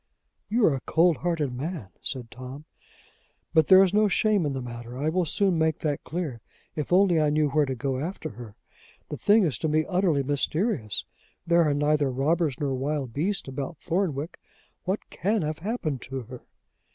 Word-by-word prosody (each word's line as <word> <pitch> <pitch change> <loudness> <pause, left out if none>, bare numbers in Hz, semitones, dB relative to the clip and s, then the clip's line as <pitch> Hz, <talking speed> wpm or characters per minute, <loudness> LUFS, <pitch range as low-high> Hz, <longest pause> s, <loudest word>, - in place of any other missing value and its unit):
"You 225 +1 +3
are 155 - +4
a 135 - -3
cold 165 0 +4
hearted 160 -7 -1
man," 140 - -5
said 125 -4 -5
Tom. 130 +4 -9 0.9
"But 160 -2 +4
there 190 0 +8
is 190 -1 +1
no 210 0 +4
shame 205 -4 +2
in 140 - -2
the 135 - -3
matter. 120 0 -7
I 150 +3 0
will 180 +2 +1
soon 185 +1 +1
make 160 -1 +1
that 145 -2 -1
clear 155 -9 -4 0.3
if 150 0 -4
only 180 -3 +5
I 150 - +3
knew 150 0 +2
where 150 0 +2
to 130 - -2
go 130 +1 -2
after 170 +7 -4
her. 110 -1 -11 0.5
The - - -4
thing 210 +1 +4
is 150 -10 0
to - - -1
me 155 0 +2
utterly 180 -7 +2
mysterious: 145 - -1 0.4
there 170 0 +4
are 145 - +1
neither 145 -1 +2
robbers 145 +2 0
nor 140 -2 -1
wild 135 -1 -2
beasts 190 - -1
about 135 +4 -5
Thornwick. 165 -3 -2 0.5
What 190 +3 -2
can 205 0 0
have 155 0 -3
happened 165 - -3
to 135 0 -5
her?" 125 +1 -10
150 Hz, 190 wpm, -26 LUFS, 135-175 Hz, 0.9 s, there